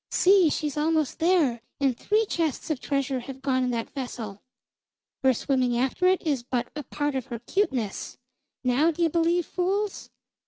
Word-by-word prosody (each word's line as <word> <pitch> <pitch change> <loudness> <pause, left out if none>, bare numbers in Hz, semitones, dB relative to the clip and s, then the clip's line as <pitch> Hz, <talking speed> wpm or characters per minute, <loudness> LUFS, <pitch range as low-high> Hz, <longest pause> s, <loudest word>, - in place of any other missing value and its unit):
"See, 375 -3 +5
she's 300 -1 -2
almost 310 -1 +1
there, 320 -9 +3 0.2
and 270 -3 +2
three 430 - +1
chests 325 - -2
of 295 - -1
treasure 275 -2 -1
have 265 +2 -9
gone 260 -2 +1
in 250 - 0
that 230 -2 -3
vessel! 230 -7 -6 0.8
Her 265 - +5
swimming 255 -1 +1
after 265 +9 +1
it 375 -1 +2
is 285 -6 +1
but 245 0 -3
a 300 - -3
part 290 +1 -2
of 260 -3 -3
her 235 - -4
cuteness. 245 - -2 0.5
Now 260 +6 +3
d'ye 335 0 +1
believe, 335 +1 +2
fools!" 390 +3 -2
280 Hz, 165 wpm, -26 LUFS, 250-335 Hz, 0.8 s, See